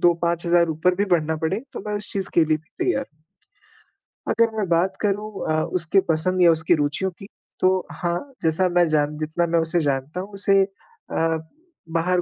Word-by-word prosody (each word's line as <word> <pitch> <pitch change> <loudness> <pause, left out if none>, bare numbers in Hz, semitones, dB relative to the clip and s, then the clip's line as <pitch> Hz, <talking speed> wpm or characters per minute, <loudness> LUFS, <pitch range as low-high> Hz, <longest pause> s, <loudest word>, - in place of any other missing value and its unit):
2-5 170 0 +2
हज़ार 170 -1 +4
ऊपर 160 +4 +1
भी 200 - +2
बढ़ना 160 -1 +2
पड़े, 165 +7 -1
तो - - -6
मैं 210 - -2
उस 205 0 -6
चीज़ 195 -2 -1
के 170 - +5
लिए 155 0 +2
भी 160 +1 -20 0.2
तैयार 315 -7 0
हूँ। 155 - -37 1.1
अगर 230 0 +2
मैं 210 -3 0
बात 175 +3 +2
करूँ 210 +1 -1 0.2
अ, 155 0 +2
उसके 180 +2 +1
पसंद 185 +3 +2
या 170 -1 +7
उसके 160 +1 +2
रूचियों 150 +5 0
की, 195 +3 -13 0.3
तो 185 0 +2
हाँ, 175 - -3
जैसा 165 +3 +2
मैं 175 -1 +3
जान 150 -1 +1
जितना 155 +3 -1
मैं 170 0 +2
उसे 165 +1 +1
जानता 145 +2 -1
हूँ, 195 - -8
उसे 195 0 +3
अ, 195 - -3 0.5
बाहर 175 +2 +1
175 Hz, 190 wpm, -23 LUFS, 160-190 Hz, 1.1 s, या